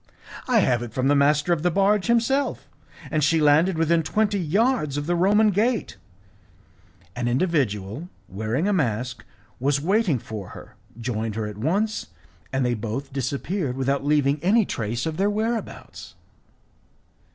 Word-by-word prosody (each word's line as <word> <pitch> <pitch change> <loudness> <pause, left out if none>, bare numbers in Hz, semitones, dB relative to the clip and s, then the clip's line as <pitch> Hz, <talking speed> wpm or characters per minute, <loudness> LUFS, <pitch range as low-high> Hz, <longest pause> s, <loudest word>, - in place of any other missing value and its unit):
"I 240 -4 +4
have 125 -8 +1
it 120 -2 -7
from 130 +1 +1
the 145 - +4
master 150 +4 +3
of 160 - -2
the 175 - +2
barge 195 +3 +2
himself, 235 +4 +1 0.4
and 155 -2 +1
she 160 +2 +3
landed 155 +4 +4
within 165 +1 +2
twenty 205 +5 0
yards 185 - +1
of 145 - -2
the 175 - 0
Roman 205 +4 +4
gate. 225 +4 0 1.2
An 120 0 -2
individual 130 - -1 0.2
wearing 110 - -2
a 205 - +2
mask 125 - -1 0.4
was 140 +2 +1
waiting 185 - +1
for 110 -5 -7
her, - - -13 0.2
joined 110 -2 -3
her 110 -1 -2
at 105 -1 -7
once, 200 - -1 0.4
and 130 -1 0
they 120 - +1
both 120 +5 -5
disappeared 140 - -2
without 135 +1 0
leaving 145 0 +2
any 210 +4 +4
trace 115 - -3
of 160 -1 -3
their 200 +2 +2
whereabouts." 220 +2 -4
150 Hz, 150 wpm, -24 LUFS, 125-195 Hz, 1.2 s, I